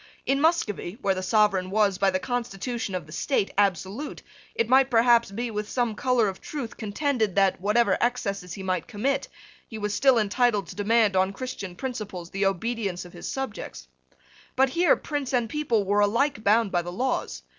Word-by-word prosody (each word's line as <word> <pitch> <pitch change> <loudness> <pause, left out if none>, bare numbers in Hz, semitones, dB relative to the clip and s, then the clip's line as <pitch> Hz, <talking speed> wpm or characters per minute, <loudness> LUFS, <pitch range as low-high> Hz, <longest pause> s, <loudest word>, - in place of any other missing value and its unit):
In 275 +1 +1
Muscovy, 225 - 0
where 195 -1 +3
the 185 - -4
sovereign 195 -2 +2
was, 200 -2 +2
by 195 -1 +4
the 185 - +1
constitution 235 -1 -3
of 180 -4 -4
the 155 - -15
state, 200 - 0
absolute, 200 - -1 0.3
it 460 0 +1
might 265 +1 +5
perhaps 235 -1 +4
be, 230 +4 -4
with 210 0 -4
some 240 -3 0
colour 245 0 +2
of 190 -1 -5
truth, 270 -7 -6
contended 220 -1 -1
that, 195 -2 +2
whatever 215 +4 +2
excesses 200 -7 -1
he 195 - -7
might 185 -2 -2
commit, 265 +5 -1 0.4
he 220 - -8
was 210 -1 -2
still 265 +2 +4
entitled 215 -1 +2
to - - -8
demand, 210 0 +2
on 190 +1 +2
Christian 195 -5 -6
principles, 210 -8 -6
the 195 0 +1
obedience 195 -2 -2
of 175 - -13
his - - -8
subjects. 270 - -5 0.7
But 265 +1 +4
here 345 +5 +4
prince 290 -3 -4
and 240 -2 +1
people 240 -5 0
were 205 +2 +2
alike 220 +4 +1
bound 215 0 +3
by 175 - +1
the 175 +1 -6
laws. 180 - -2
215 Hz, 185 wpm, -26 LUFS, 195-250 Hz, 0.7 s, might